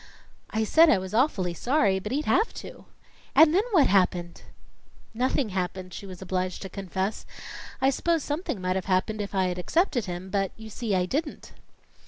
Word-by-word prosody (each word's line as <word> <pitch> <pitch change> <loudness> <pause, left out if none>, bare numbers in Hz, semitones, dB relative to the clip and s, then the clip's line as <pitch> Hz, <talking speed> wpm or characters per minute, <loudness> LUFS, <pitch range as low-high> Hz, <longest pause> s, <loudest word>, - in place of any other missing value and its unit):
"I 220 0 0
said 320 +9 +6
I 290 - +5
was 190 +1 -6
awfully 215 - +1
sorry, 205 - +1
but 210 +3 -6
he'd 290 +3 -1
have 435 +6 +2
to." - - -10 0.5
"And 315 -1 +7
then 380 - +4
what 340 - +5
happened?" 180 -3 +1 0.7
"Nothing 250 +1 0
happened," 185 -1 -4
she 200 - -8
was 185 -1 -9
obliged 185 0 -2
to 195 - -6
confess. 190 +2 -3 0.6
"I 270 - +3
s'pose 330 +2 0
something 290 - -3
might 185 0 -1
have 190 - -4
happened 200 +3 0
if 200 0 -5
I'd 180 -1 0
accepted 270 - +1
him, 180 0 -6
but 195 -2 0
you 220 0 -10
see, 215 -2 -2
I 180 -1 +2
didn't." 290 - -4
200 Hz, 180 wpm, -26 LUFS, 185-270 Hz, 0.7 s, And